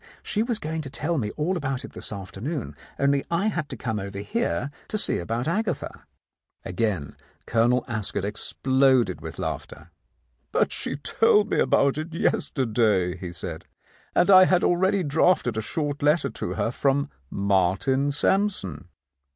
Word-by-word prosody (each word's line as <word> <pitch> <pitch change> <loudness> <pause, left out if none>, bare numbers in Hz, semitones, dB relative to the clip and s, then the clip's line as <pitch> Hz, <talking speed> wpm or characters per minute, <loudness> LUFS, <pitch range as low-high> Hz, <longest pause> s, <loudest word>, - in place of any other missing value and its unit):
She 210 - 0
was 235 0 0
going 160 -1 -4
to 140 - -7
tell 155 +4 -1
me 105 -4 -2
all 165 +5 0
about 135 -6 -2
it - - -11
this - - -6
afternoon, 105 - -5 0.2
only 140 0 +2
I 175 +6 +1
had 170 -7 -3
to - - -6
come 110 -4 -2
over 100 0 -6
here 145 - -2 0.2
to 215 - -2
see - - +1
about 115 - -2
Agatha." 190 -2 -2 0.6
Again 90 -7 -2 0.3
Colonel 120 +2 +2
Ascot 105 -4 -2
exploded 130 0 +2
with - - -8
laughter. - - -6 0.6
"But - - +2
she - - -1
told 210 +8 +2
me - - +2
about 140 +2 +3
it 160 +1 -6
yesterday," 110 - +1
he 90 -1 -7
said, 85 - -6 0.5
"and 190 - +4
I 185 -1 +9
had 180 -1 +3
already 190 +2 +2
drafted 145 -4 +2
a 110 - -1
short 145 +5 -2
letter 150 +3 +2
to - - -4
her 115 - 0
from 140 +2 0 0.2
Martin 100 +8 +1
Sampson." 150 - 0
135 Hz, 155 wpm, -25 LUFS, 105-170 Hz, 0.6 s, I